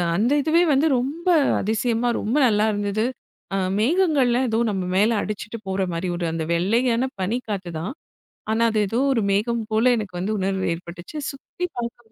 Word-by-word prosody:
அந்த 220 +8 +2
இதுவே 325 +4 +3
வந்து 280 +4 +3
ரொம்ப 300 +8 -4 0.3
அதிசயமா, 230 +3 0
ரொம்ப 230 +7 0
நல்லா 210 -2 +2
இருந்தது. 205 +2 -1 0.5
அ - - +1 0.2
மேகங்கள்லாம் 265 - +2
ஏதோ, 225 0 +1
நம்ம 190 -2 -2
மேல 205 +4 +4
அடிச்சிட்டு 215 +2 -5
போற 190 0 -1
மாரி 170 +2 -2
ஒரு 175 0 -2
அந்த 165 0 -2
வெள்ளையான 230 +8 +1
பனி 205 +6 0
காத்துதான். 185 0 -4 0.6
ஆனா, 225 +1 +2
அது 215 - +1
ஏதோ 225 +5 -1
ஒரு 230 - +1
மேகம் 225 +3 0
போல 230 +3 +4
எனக்கு 205 -5 -5
வந்து 205 +4 -1
உணர்வு 190 0 -1
ஏற்பட்டுச்சு. 175 - -9
சுத்தி 280 +6 -6
பார்க்கும்போது 235 -1 -6
220 Hz, 165 wpm, -23 LUFS, 195-245 Hz, 0.6 s, மேல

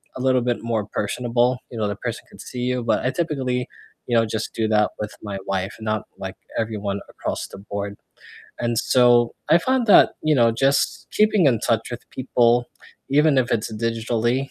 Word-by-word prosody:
a 130 - -5
little 130 -1 +3
bit 120 -1 -1
more 115 -3 -1
personable. 120 +4 0
You 120 - -8
know, 105 -1 0
the 105 - -3
person - - -5
could - - -13
see 125 - -7
you, 125 -1 -1
but 115 +1 0
I 130 - +2
typically, 130 -7 -1 0.4
you 120 - 0
know, 115 - +4
just 110 0 -4
do 110 -1 0
that 105 -1 +3
with 105 0 -4
my 100 -2 -5
wife, 95 +1 -2
not, 110 -1 -1
like, - - -6 0.2
everyone 105 -3 -2
across - - -4
the - - -11
board, 100 0 -5 0.6
and 120 -1 -1
so, 120 -2 +4
I 165 - +6
find 255 +3 +1
that, 205 - +6
you 155 -1 +3
know, 115 -3 +4
just 135 +4 +1
keeping 210 -6 +4
in 115 -5 +3
touch 115 +1 0
with 120 - -8
people, 120 -2 +2 0.4
even 145 0 +4
if 120 - +1
it's 110 0 -1
digitally, 115 +3 -1
120 Hz, 190 wpm, -22 LUFS, 110-130 Hz, 0.6 s, I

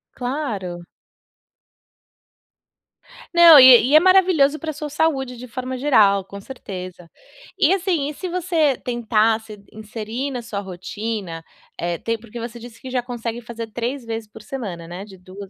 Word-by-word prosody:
Claro. 215 - -4 2.5
Não, 335 -4 +10
e 255 -1 +8
e 295 - +4
é 310 - +10
maravilhoso 355 -6 +4
pra 315 -1 -4
sua 295 0 -6
saúde 270 -5 -1
de 250 +1 -9
forma 255 +2 -5
geral, 210 -8 +3
com 200 +1 -10
certeza. 185 -7 -9 0.5
E - - +4
assim, 345 -7 0
e - - -6
se 365 +5 -6
você 335 -6 +1
tentasse 220 -2 0 0.2
inserir 220 +5 -5
na 250 -3 -5
sua 200 -3 -5
rotina, 190 -1 -6 0.4
eh, 170 0 -2
tem 230 0 -2
porque 235 +1 -10
você 235 +1 -7
disse 230 -1 -12
que 260 -2 -9
já 250 - 0
consegue 240 -1 -5
fazer 230 -1 -7
3 240 +2 -4
vezes 225 -1 -5
por 220 0 -13
semana, 195 -10 -6
né? 180 +3 -7
De 195 -2 -13
dua 185 +2 -11
235 Hz, 155 wpm, -21 LUFS, 205-275 Hz, 2.5 s, Não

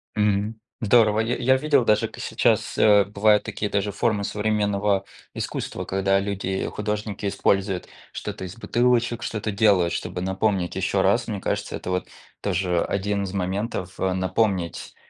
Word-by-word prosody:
Мгм. 105 +1 +1 0.2
Здорово! 110 -1 +4
Я 115 +2 0
я 130 +2 +3
видел 145 -2 +3
даже, 110 -2 +2
к - - -14
сейчас, - - +1
э, 105 -1 +6
бывают 105 +1 +3
такие 105 -1 -3
даже 100 0 0
формы 105 0 0
современного 105 -1 0 0.3
искусства, - - -4
когда 95 0 +1
люди-художники 100 +1 -3
используют 95 -1 0 0.3
что-то 95 - -5
из 90 +3 -8
бутылочек, 120 0 +1
что-то 110 -1 -3
делают, 100 -4 +3
чтобы 90 - -4
напомнить 95 -1 0
ещё - - +1
раз. - - +2
Мне - - -4
кажется, - - -2
это - - -6
вот 90 0 -1 0.3
тоже 90 -3 0
1 100 +1 -1
из 95 -1 -5
моментов, 95 -1 -3
э, 95 -1 +1
напомнить, 95 -1 -1
100 Hz, 145 wpm, -24 LUFS, 95-110 Hz, 0.3 s, э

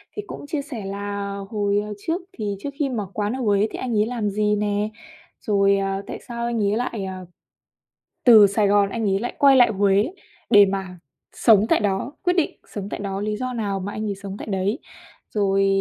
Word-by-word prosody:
Thì 420 - -4
cũng - - -8
chia 290 0 -2
sẻ 250 -8 -7
là 200 0 -4
hồi, 205 -2 +1
à, 210 - -7
trước 330 - -2
thì 205 -3 -3
trước 280 - -4
khi 285 -3 +1
mở 215 -6 -3
quán 210 +2 -1
ở 265 - -4
Huế 205 -2 +2
thì - - -6
anh 240 -4 -1
ấy 210 - +3
làm 225 -3 -2
gì 210 +1 +1
nè, 210 0 0 0.5
rồi, 200 -1 +3
à, 195 0 -1
tại - - -6
sao 235 -1 -4
anh 235 -2 -1
ấy 205 +2 +1
lại, 235 -4 -3
à, 185 -1 -6 1.0
từ 220 -5 +8
Sài 200 +1 +1
Gòn 200 0 +3
anh 225 +3 -3
ấy 195 0 +1
lại 240 - -3
quay 275 -1 +7
lại 245 -3 +6
Huế 200 - +2 0.4
để 205 -3 +8
mà 190 -2 -4 0.3
sống 215 -3 +5
tại - - +4
đó, 205 +5 -1
quyết 360 -1 +3
định 340 -4 -1
sống 200 -1 -6
tại - - -5
đó, 195 -1 -3
lý 210 0 -2
do 255 +2 -3
nào 205 -4 -2
mà 195 +2 -5
anh 215 +1 -4
ấy 205 -2 -2
sống 195 0 -7
tại - - -7
đấy. 200 - -1 0.5
Rồi, 195 -1 +2
205 Hz, 220 wpm, -23 LUFS, 200-235 Hz, 1.0 s, từ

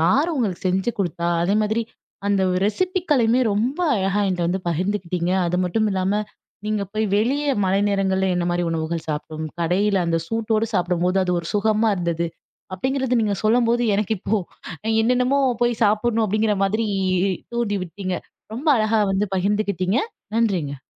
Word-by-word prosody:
யார் 280 - +3
உங்களுக்கு 210 -11 -2
செஞ்சு 190 +5 +1
குடுத்தா? 170 -2 -1
அதே 195 +4 +1
மாதிரி, 220 +2 0 0.4
அந்த 200 -1 +2 0.2
ரெசிபிக்களையுமே 280 - +1
ரொம்ப 240 - -1 0.2
அழகா 195 0 0
என்ட்ட 180 -2 -1
வந்து 185 +2 -1
பகிர்ந்துக்கிட்டீங்க. 180 0 -1
அது 175 +1 0
மட்டும் 215 +4 +1
இல்லாம, 190 +2 0 0.5
நீங்க 215 -1 0
போய் 215 0 0
வெளியே 280 +7 +1
மழை 190 +1 +2
நேரங்கள்ல 190 -1 +1
என்னமாரி 175 0 0
உணவுகள் 165 0 -3
சாப்பிடும் 155 +1 -4
கடையில 195 +4 +1
அந்த 165 0 +1
சூட்டோட 225 +1 0
சாப்பிடும்போது 180 0 +1
அது 180 - -1
ஒரு 170 - -6
சுகமா 215 +2 +2
இருந்தது. 170 -2 -1 0.5
அப்பிடிங்கிறது 260 +4 0
நீங்க 205 -2 +1
சொல்லும்போது 235 +1 +3
எனக்கு 210 +1 0
இப்போ, 220 - 0 0.7
என்னென்னமோ 250 +3 +2 0.2
போய் 240 -1 +1
சாப்பிடணும் 220 +2 +2
அப்பிடிங்கிற 215 0 +1
மாதிரி 215 +3 0 0.7
தூண்டி 210 -4 0
விட்டீங்க. 185 +2 -4 0.4
ரொம்ப 290 +7 -3
அழகா 215 0 +2
வந்து 195 +2 +1
பகிர்ந்துக்கிட்டீங்க. 200 +1 0 0.4
நன்றிங்க. 170 - 0
205 Hz, 140 wpm, -22 LUFS, 180-225 Hz, 0.7 s, யார்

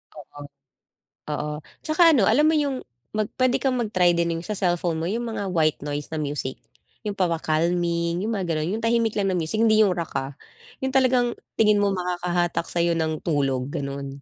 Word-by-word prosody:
Oo. 145 -1 -12 0.9
Oo, 150 0 -2 0.3
tsaka 330 +2 +5
ano, 235 -9 +4
alam 250 +9 +4
mo 320 - +2
yun 280 -3 -1 0.3
mag 215 -1 -1
pwede 255 0 +4
kang 260 -2 +1
mag-try 185 -7 +2
din 170 -1 0
yung 165 - -7
sa 215 - -3
cellphone 175 -3 0
mo, - - -2
yung 235 +4 -2
mga 210 -3 -3
white 155 -4 +1
noise 145 0 -4
na - - -2
music. 145 -3 -3 0.5
Yung 210 - -1
pampa-calming, 170 0 0
yung 225 - -1
mga 195 -3 -2
ganun. 155 +5 -1
Yung 225 - -7
tahimik 230 -1 +2
lang 195 -1 +1
na 185 - 0
music, 170 +6 -1
hindi 220 -1 +5
yung 200 -4 +4
rock 170 -2 -4
ah. 135 +1 -6 0.5
Yung 265 0 -1
talagang 255 -2 +3 0.2
tingin 210 -2 +4
mo 200 - +3
makakahatak 175 -1 -1
sayo 170 0 +1
ng 160 -1 -1
tulog, 135 -5 0
ganon. 140 0 -5
175 Hz, 190 wpm, -24 LUFS, 160-220 Hz, 0.9 s, tsaka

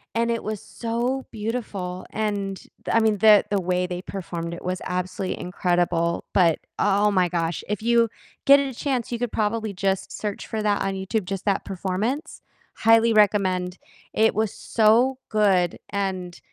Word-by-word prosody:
and 235 0 +1
it 230 - -1
was 215 -1 -4
so 240 +3 -2
beautiful, 210 -5 -4
and 200 -3 -2 0.3
I 230 - +4
mean, 215 -2 +2
the 210 0 +7
the 200 -1 +1
way 180 0 0
they 180 0 -4
performed 170 -3 -5
it 170 - -8
was 180 0 -3
absolutely 180 +1 -3
incredible, 175 -1 0
but, 170 -4 +4 0.2
oh 205 +1 +3
my 185 -2 +3
gosh, 165 -1 -2
if 210 0 -2
you 235 0 +4 0.4
get 280 +1 +8
a 270 -2 -3
chance, 250 -2 -2
you 235 - -2
could 245 -2 -2
probably 215 -1 -1
just 195 0 -1
search 210 -2 -5
for 215 -1 -3
that 205 -1 +1
on 195 0 -1
YouTube, 190 +1 -2
just 195 0 -4
that 200 -1 0
performance. 200 - -3 0.3
Highly 225 +1 +5
recommend. 190 -3 +2 0.4
It 220 +1 +3
was 220 -1 0
so 235 +4 +3
good, 195 -5 +2
and 190 -3 -3
200 Hz, 165 wpm, -24 LUFS, 180-225 Hz, 0.4 s, get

